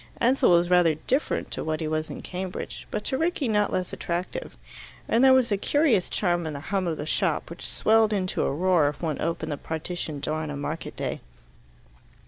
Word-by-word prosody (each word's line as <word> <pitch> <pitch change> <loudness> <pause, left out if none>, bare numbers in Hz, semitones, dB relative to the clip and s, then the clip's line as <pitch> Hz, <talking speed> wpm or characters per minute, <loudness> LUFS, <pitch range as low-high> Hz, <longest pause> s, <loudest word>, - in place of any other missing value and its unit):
Ansell 255 +3 +4
was 175 0 +4
rather 175 -3 +5
different 260 - -1
to - - -3
what 155 0 -2
he 160 - -2
was 155 0 -2
in - - -7
Cambridge, 185 0 -6
but 210 - -3
to 265 - -1
Rickie 325 -4 0
not 210 -2 +2
less 185 -1 -2
attractive. 175 +1 -4 0.5
And 235 +3 +3
there 265 - +8
was 260 -3 +4
a 200 - +3
curious 255 - +2
charm 175 -4 0
in 155 - -4
the 140 - -5
hum 190 -2 +1
of 160 -2 -1
the 150 - -4
shop, 165 0 0
which 170 - -6
swelled 220 0 +3
into 190 -3 -1
a - - +1
roar 165 0 +3
if 145 +3 -9
one 155 -3 -2
opened 160 -1 -2
the 145 - -2
partition 160 -1 -4
door 155 +2 -2
on 155 - -4
a 145 - -4
market 150 +3 -5
day. - - -3
175 Hz, 210 wpm, -26 LUFS, 155-210 Hz, 0.5 s, there